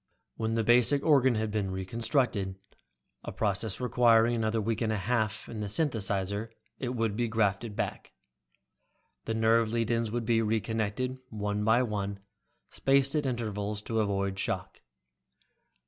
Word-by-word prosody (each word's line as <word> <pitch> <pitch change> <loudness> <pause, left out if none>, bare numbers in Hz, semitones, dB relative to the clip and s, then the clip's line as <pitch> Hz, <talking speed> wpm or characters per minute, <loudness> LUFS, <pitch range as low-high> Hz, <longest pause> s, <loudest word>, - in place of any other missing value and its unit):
When 110 0 -1
the 115 - +1
basic 125 +5 +4
organ 130 -5 +4
had 110 0 -1
been 105 -2 -1
reconstructed, 100 +1 -1 0.7
a - - -5
process 100 -1 -1
requiring 120 -2 +4
another 110 -1 0
week 110 +2 -1
and 110 -2 +1
a 110 - 0
half 110 +1 -1
in 110 - -7
the 105 - -3
synthesizer, 100 - -1 0.3
it 125 -1 -3
would 115 -3 0
be 120 +1 0
grafted 110 -1 0
back. - - -4 1.1
The 110 - -2
nerve 110 0 +3
lead 115 -1 0
ins 115 -1 0
would 120 0 -2
then 115 0 +2
be - - +2
reconnected, 110 +3 -1
one 105 -1 -2
by 110 +4 +4
one, 100 -3 -3 0.5
spaced 135 0 +2
at 150 -3 0
intervals 105 -4 -3
to 115 0 -1
avoid 100 -2 -1
shock. - - -3
110 Hz, 150 wpm, -29 LUFS, 105-120 Hz, 1.1 s, basic